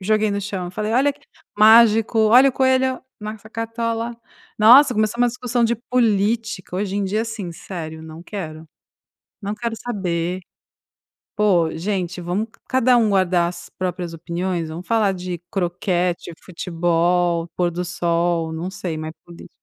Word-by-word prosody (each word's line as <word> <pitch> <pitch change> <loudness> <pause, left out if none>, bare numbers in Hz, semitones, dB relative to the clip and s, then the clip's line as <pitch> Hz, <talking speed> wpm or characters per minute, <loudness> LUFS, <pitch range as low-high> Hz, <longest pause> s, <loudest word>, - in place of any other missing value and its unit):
joguei 215 +2 +1
no 200 0 -1
chão. 190 -3 -4
Falei: 215 +4 -3
"Olha" 275 +4 +3 0.4
Mágico: 225 +1 +6
"Olha, 240 +5 +6
o - - -14
coelho 260 0 +2 0.2
na 210 +1 -5
essa 220 0 -15
cartola". 230 +1 -3 0.5
Nossa, 250 +6 +8
começou 215 +1 0
uma 245 0 +4
discussão 245 0 -2
de 235 +1 +1
política, 220 -4 0
hoje 195 0 -2
em 205 - 0
dia, 205 +3 0
assim, 220 -6 -5
sério, 160 -2 -7
não 160 +1 -10
quero, 160 -5 -7 0.7
não 200 0 -3
quero 235 0 -3
saber. 185 -6 -3 1.0
Poxa, 180 -7 +2
gente, 185 -1 -2
vamos 180 +6 -2
c - - -27
cada 255 -1 +4
um 225 - +3
guardar 180 -3 +2
as 175 0 -9
próprias 180 -2 -4
opiniões. 170 0 -3
Vamos 165 +3 -8
falar 220 -4 +2
de 180 -1 -5
croquete, 180 -2 -1
futebol, 170 0 0
pôr 175 -1 +1
do 175 +1 -3
sol, 170 -2 0
não 165 +3 -4
sei, 175 -4 -5
mas 155 0 -5
política 170 -1 -13
195 Hz, 155 wpm, -21 LUFS, 175-225 Hz, 1.0 s, Nossa